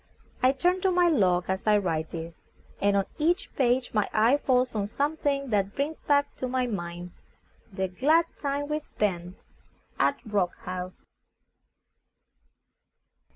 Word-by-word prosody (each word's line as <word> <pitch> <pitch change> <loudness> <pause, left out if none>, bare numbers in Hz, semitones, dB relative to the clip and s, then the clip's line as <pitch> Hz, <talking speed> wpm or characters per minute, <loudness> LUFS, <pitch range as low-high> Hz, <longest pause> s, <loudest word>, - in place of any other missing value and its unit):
I 255 - +5
turn 355 +7 +1
to 380 - +3
my 355 -1 +4
log 180 - +2
as 190 0 -1
I 210 -1 +6
write 160 -5 -1
this, 165 0 -7 0.4
and 200 0 +3
on 195 - +1
each 350 +6 0
page 250 -1 +1
my 210 -2 +1
eye 230 +6 +4
falls 255 -3 +1
on 205 -2 -1
some 285 +8 -1
thing 275 -4 -1
that 200 -1 0
brings 295 +3 -2
back 285 -1 +1
to 255 - -3
my 255 0 0
mind 175 -5 -5 0.6
the 190 0 -2
glad 300 - +3
time 285 0 -2
we 300 0 0
spent 185 - -3 0.6
at 280 - +2
Rock 200 -5 0
House. 180 0 -6
235 Hz, 150 wpm, -27 LUFS, 190-285 Hz, 0.6 s, I